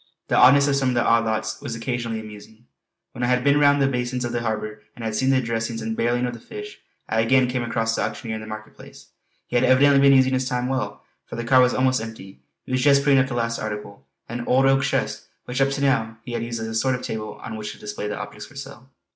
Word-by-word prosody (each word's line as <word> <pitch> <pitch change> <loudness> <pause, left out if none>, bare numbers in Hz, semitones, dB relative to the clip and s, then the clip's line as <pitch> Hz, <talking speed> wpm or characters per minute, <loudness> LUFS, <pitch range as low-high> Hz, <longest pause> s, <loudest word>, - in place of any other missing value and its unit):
The - - +2
oddness 140 +2 +6
of 140 - +2
some 135 -2 +1
of 125 - -1
the 120 - +2
odd 115 0 +3
lots 110 +1 -2
was 135 -5 -5
occasionally 115 -1 -3
amusing. 110 +1 -12 0.5
When 125 - -6
I - - +2
had 125 0 +2
been 140 +1 +4
round 145 0 +5
the - - +3
basins 125 -1 -2
of 120 - -3
the 120 0 -2
harbour 110 -1 -3
and 115 - -7
had 110 - -2
seen 130 +4 +1
the 130 -1 +3
dressings 115 -1 -3
and 110 0 -3
barrelling 120 +2 +1
of 120 - -4
the 120 - -9
fish, 420 - -9 0.3
I 110 - 0
again 130 +3 +3
came 125 0 -2
across 115 -1 -1
the - - -1
auctioneer 115 -3 -3
in - - -8
the 110 - -9
market 110 0 -8
place. - - -15 0.4
He 125 - -1
had 120 - +2
evidently 140 +2 +5
been 140 -1 +7
using 130 0 +3
his 130 -1 0
time 125 0 -1
well, 130 -1 -3 0.2
for - - -7
the 120 - -4
cart 130 +2 +5
was 125 0 +3
almost 130 -2 +2
empty. 110 -4 -9 0.3
He - - -9
was 130 0 +1
just 140 0 +4
putting 140 -2 +5
up 135 - +2
the 125 - -5
last 115 -1 -1
article, 105 -4 -6 0.2
an 120 +1 -5
old 130 +2 +4
oak 135 0 +4
chest 140 - -2 0.2
which 125 +2 -2
up 135 - +4
to 140 0 -3
now 115 -5 +1
he 125 - -7
had 115 -1 -2
used 115 0 -4
as 110 - -3
a 110 - -5
sort 125 +4 +1
of 125 - -7
table 110 -1 -5
on 115 - -6
which 105 -1 -6
to - - -15
display 105 0 -5
the 105 - -4
object 105 0 -7
for 145 - -19
sale. 135 -1 -10
120 Hz, 275 wpm, -23 LUFS, 110-130 Hz, 0.5 s, been